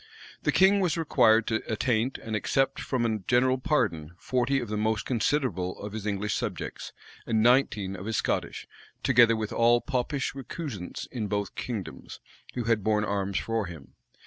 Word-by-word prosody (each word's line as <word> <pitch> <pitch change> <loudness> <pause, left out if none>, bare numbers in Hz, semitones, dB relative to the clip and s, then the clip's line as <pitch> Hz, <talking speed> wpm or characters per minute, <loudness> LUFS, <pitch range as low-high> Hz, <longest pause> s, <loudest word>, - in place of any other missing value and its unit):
The - - +1
king 195 +2 +5
was 180 -4 +1
required 115 -8 +4
to 110 -1 0
attaint 120 +2 0
and 110 -1 -5
except 135 +5 +1
from 125 -3 -1
a 110 -2 0
general 125 +6 +2
pardon 100 - 0
forty 130 +6 0
of 120 - -5
the 105 - -3
most 110 0 0
considerable 115 - 0
of 105 0 -7
his 110 -1 -5
English 105 0 -1
subjects, - - -4 0.4
and 110 -2 +2
nineteen 115 -6 +3
of 95 +2 -7
his 110 - -1
Scottish, - - -2 0.4
together 120 -3 +5
with 110 -1 -3
all 120 +1 +4
Popish 135 0 -2
recusants 135 - -6
in 115 -5 -3
both 100 -1 -2
kingdoms 110 -7 -6 0.4
who 125 - -1
had 115 -2 +1
borne 105 0 +2
arms 100 -1 -1
for 115 -3 -1
him. 80 -5 -11
115 Hz, 170 wpm, -27 LUFS, 105-130 Hz, 0.4 s, king